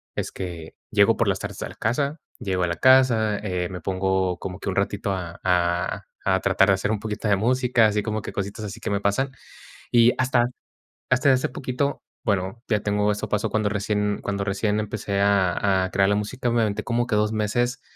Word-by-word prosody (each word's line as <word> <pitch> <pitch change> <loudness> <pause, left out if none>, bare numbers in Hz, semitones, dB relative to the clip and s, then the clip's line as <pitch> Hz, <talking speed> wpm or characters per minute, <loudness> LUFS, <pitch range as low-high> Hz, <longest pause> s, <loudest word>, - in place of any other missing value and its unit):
es - - -3
que 85 -4 -7 0.2
llego - - +4
por - - +1
las - - +1
tardes - - -6
a - - -3
la - - -12
casa, 140 +7 -1 0.2
llego 95 -2 -1
a - - +2
la 85 -1 -2
casa, 120 -3 +4
eh, 90 -4 -2
me 90 -2 -7
pongo 95 0 0
como 90 -1 -6
que - - -4
un 95 - -3
ratito 100 0 0
a 90 -3 -5
a 90 -1 0 0.2
a 95 -1 +2
tratar 95 0 +3
de 100 - +5
hacer 95 +3 -1
un 110 - -1
poquito 110 +1 -4
de 100 - +4
música, 120 +2 +3
así 105 -1 0
como 110 0 -2
que - - -6
cositas 100 +2 -4
así 100 - -7
que - - -4
me 100 0 0
pasan. 105 +7 0 0.6
Y 120 0 +6
hasta 125 -2 +3 0.7
hasta 130 +2 +4
hace 130 - 0
poquito 130 +2 -2 0.2
bueno, 100 +1 -1
ya 105 -3 +2
tengo 105 0 +1
eso 105 - -4
pasó 105 +1 0
cuando 110 0 +1
recién 105 0 -1
cuando 100 0 -2
recién 105 +2 0
empecé 105 -2 -2
a 95 -1 +2
a 95 - -3
crear 95 +1 +3
la - - +3
música, 120 +4 -2
me 115 0 +2
aventé 105 -2 -1
como 120 0 0
que 115 - -1
2 105 +1 +1
meses, 120 +4 -1
105 Hz, 215 wpm, -24 LUFS, 95-115 Hz, 0.7 s, Y